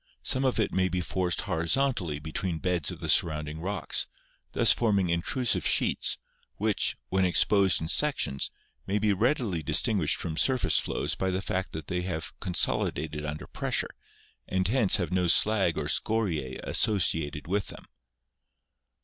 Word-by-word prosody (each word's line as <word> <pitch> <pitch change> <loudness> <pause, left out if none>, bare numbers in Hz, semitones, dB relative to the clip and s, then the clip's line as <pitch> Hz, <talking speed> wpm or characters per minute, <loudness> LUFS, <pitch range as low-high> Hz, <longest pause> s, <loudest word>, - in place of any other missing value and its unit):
Some 130 0 +1
of 130 -3 +1
it 105 - 0
may 95 0 +2
be 90 - -1
forced 90 0 -1
horizon 105 +10 +1
tally 85 -9 -4
between 80 +3 -3
beds 90 -3 0
of - - -7
the - - -3
surrounding 75 -1 +1
rocks, 95 +5 -1 0.5
thus - - +7
forming 100 -6 +2
intrusive 105 +8 0
sheets, - - +1 0.4
which, 105 0 0
when 95 0 +2
exposed 95 +1 +3
in 80 - -4
sections, 110 - +1 0.4
may 100 - 0
be 105 -1 +2
readily 110 - 0
distinguished 80 - +1
from 80 -3 -5
surface 130 -2 +2
flows - - -2
by 95 - -1
the 95 0 -1
fact 95 -1 -3
that 80 0 -6
they 90 -1 -2
have 85 -4 -4
consolidated 80 -3 -1
under 75 0 -5
pressure, - - -2 0.5
and 95 0 0
hence 115 -5 +3
have 90 -1 -1
no 90 -1 +2
slag 95 0 +3
or - - -2
scoriae 85 -13 -1
associated 80 -8 +1
with 100 +3 -1
them. - - -10
90 Hz, 155 wpm, -28 LUFS, 80-105 Hz, 0.5 s, thus